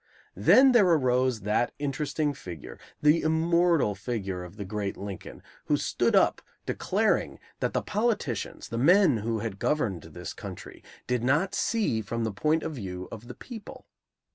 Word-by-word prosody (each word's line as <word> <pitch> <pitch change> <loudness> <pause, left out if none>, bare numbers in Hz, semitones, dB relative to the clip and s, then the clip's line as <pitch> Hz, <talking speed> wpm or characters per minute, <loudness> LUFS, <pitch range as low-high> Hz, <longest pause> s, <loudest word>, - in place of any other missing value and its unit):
Then 265 +1 +6
there 230 -6 +5
arose 130 -7 +2
that 105 +4 0
interesting 145 +1 -1
figure, 90 - -9 0.2
the 150 +2 +5
immortal 165 -5 +2
figure 100 -3 -4
of 90 +2 -11
the 100 - -5
great 100 0 -3
Lincoln, 100 -2 -8 0.2
who - - +2
stood - - +1
up - - +3 0.2
declaring - - 0 0.2
that - - -1
the - - 0
politicians, 210 - -2
the 115 - -3
men 170 - +5
who 110 +1 -2
had 105 -3 -5
governed 110 - 0
this - - -8
country, - - -9 0.2
did 125 -1 -1
not 150 +9 +2
see 210 - 0
from 115 +1 -3
the 110 -2 -2
point 155 +10 +1
of 160 - -3
view 90 -7 -6
of 115 +1 -9
the 125 - -8
people. 230 -4 -10
125 Hz, 160 wpm, -27 LUFS, 105-160 Hz, 0.2 s, Then